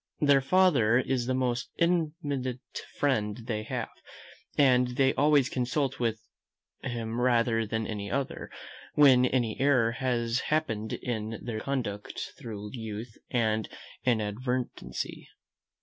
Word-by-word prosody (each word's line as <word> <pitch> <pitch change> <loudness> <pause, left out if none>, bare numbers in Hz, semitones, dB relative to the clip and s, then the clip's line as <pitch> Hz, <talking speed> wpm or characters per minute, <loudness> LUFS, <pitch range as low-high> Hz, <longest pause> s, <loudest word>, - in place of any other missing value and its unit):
Their 140 -2 +5
father 135 -8 +4
is 125 -1 0
the 130 - +1
most 125 -2 -1
intimate 150 -7 0 0.4
friend 110 -7 +1
they 115 -2 -3
have; 110 - -4 0.7
and 125 -3 +5
they 135 -1 +4
always 145 -2 +4
consult 130 +2 -1 0.8
him 120 -2 -3
rather 115 -2 +2
than 110 +1 -2
any 105 -2 -4
other, 140 +3 -3 0.5
when 130 -4 +7
any 120 -4 0
error 130 -5 +4
has 120 -1 0
happened 110 -9 -1
in 110 -2 -3
their 115 -3 -3
conduct 110 -6 -4
through 105 -6 -7
youth 110 -1 -6
and 110 -3 +1 0.3
inadvertency. 125 +2 -2
125 Hz, 115 wpm, -29 LUFS, 110-135 Hz, 0.8 s, when